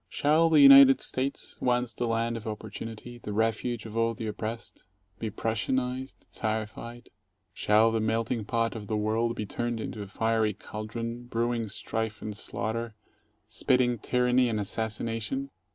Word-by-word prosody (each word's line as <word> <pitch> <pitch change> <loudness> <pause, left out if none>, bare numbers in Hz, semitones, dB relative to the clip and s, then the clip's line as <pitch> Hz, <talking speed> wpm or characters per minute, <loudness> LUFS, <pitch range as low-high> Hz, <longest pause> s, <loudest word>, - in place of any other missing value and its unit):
Shall 155 +3 +3
the 155 -2 +6
United 135 -1 +9
States, 135 +2 -3
once 125 -2 +1
the 120 +2 -2
land 115 +1 0
of 115 -1 -6
opportunity, 115 +2 -7
the 105 - -6
refuge 115 +1 0
of 110 -1 -8
all 115 0 +1
the 115 - -5
oppressed, 110 -1 -6 0.3
be 110 - -2
Prussianized, 125 +5 -2
Czarified? 110 +2 -4 0.4
Shall 110 +3 +4
the 115 - 0
melt 110 +1 0
ing 115 -4 -1
pot 115 +1 0
of 105 -2 -7
the 110 - -1
world 110 +2 0
be 105 - -3
turned 120 +3 -3
into 110 -1 -5
a 100 - -6
fiery 110 0 0
caldron 115 +3 -6
brewing 115 -1 -1
strife 110 +2 -3
and 105 -1 -5
slaughter, 110 +2 -4 0.5
spitting 125 -2 +2
tyranny 125 +2 +2
and 110 -2 -1
assassination? 115 +5 -3
115 Hz, 150 wpm, -28 LUFS, 110-120 Hz, 0.5 s, United